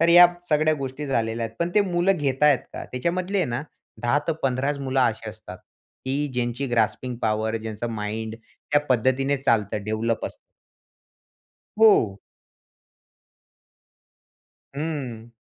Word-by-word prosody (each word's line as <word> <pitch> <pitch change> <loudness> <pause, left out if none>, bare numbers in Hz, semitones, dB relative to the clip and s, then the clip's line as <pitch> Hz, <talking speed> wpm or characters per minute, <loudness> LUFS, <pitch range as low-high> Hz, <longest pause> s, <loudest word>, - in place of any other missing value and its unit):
तर 165 - +4
या 175 +1 +10 0.2
सगळ्या 155 0 +3
गोष्टी 140 +1 -5
झालेल्या 115 -3 0
आहेत. 110 - -14
पण 170 +1 0
ते 210 - +6
मुलं 185 0 +2
घेता 145 -1 +2
आहेत 140 -4 +5
का - - -6
त्याच्यामधले 180 +9 -1
आहे 185 - +2
ना 120 +3 -2 0.4
10 120 +4 +3
ते - - +4
15च 135 +2 0
मुलं 135 -1 0
अशी 110 -3 0
असतात, 110 0 -11 0.5
की 140 +3 -1
ज्यांची 120 +2 -1
ग्रास्पिंग 120 +1 0
पॉवर, 110 +1 0
ज्यांचा 110 +1 -4
माइंड 110 0 -4
त्या 145 +5 -2
पद्धतीने 130 +3 +2
चालतं, 105 -6 +1
डेव्हलप 110 +1 -1
असतं. - - -9 1.4
हो. 115 - +5 2.6
हं. 135 -7 -4
130 Hz, 130 wpm, -24 LUFS, 115-150 Hz, 2.6 s, या